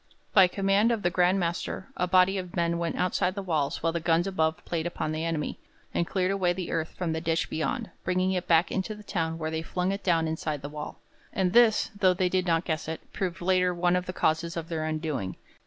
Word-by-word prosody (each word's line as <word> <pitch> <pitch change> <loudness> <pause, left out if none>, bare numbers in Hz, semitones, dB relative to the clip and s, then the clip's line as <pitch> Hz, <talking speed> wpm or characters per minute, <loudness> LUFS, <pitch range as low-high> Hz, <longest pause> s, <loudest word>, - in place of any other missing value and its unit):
By 190 -3 +8
command 195 +4 +2
of 225 -3 -1
the 175 - +2
Grand 180 +2 +3
Master 175 +2 -2
a 180 - 0
body 185 +2 +4
of 180 -2 -7
men 170 -1 +1
went 170 -1 -1
outside 180 0 0
the 200 - -4
walls 155 -4 -1
while 165 - +1
the 170 - 0
guns 165 +1 +2
above 160 -5 0
played 170 -1 -2
upon 155 -2 -3
the 155 +1 -2
enemy, 165 -3 -2 0.3
and 170 - 0
cleared 185 -1 0
away 185 -3 +1
the 180 -1 -5
earth 160 -1 -2
from 170 -3 -1
the 160 - -2
ditch 165 0 0
beyond, 220 - -2
bringing 185 +1 +1
it 180 -2 -2
back 165 +1 +4
into 195 +3 -2
the 210 - -12
town 165 -4 -2
where 160 -1 -3
they 160 0 -2
flung 180 +3 -1
it 200 +1 -4
down 165 -3 +2
inside 155 -2 -3
the 145 - -4
wall. 150 0 -7 0.3
And 185 -2 0
this, 235 -3 +5
though 185 -2 +4
they 185 0 +1
did 185 0 0
not 165 0 +2
guess 160 -1 -2
it, 160 0 -7
proved 185 -2 -3
later 180 0 +2
one 175 +1 +2
of 180 0 -1
the - - -2
causes 165 +1 0
of 165 0 -5
their 160 -2 -2
undoing. 155 - -2
175 Hz, 235 wpm, -28 LUFS, 160-185 Hz, 0.3 s, By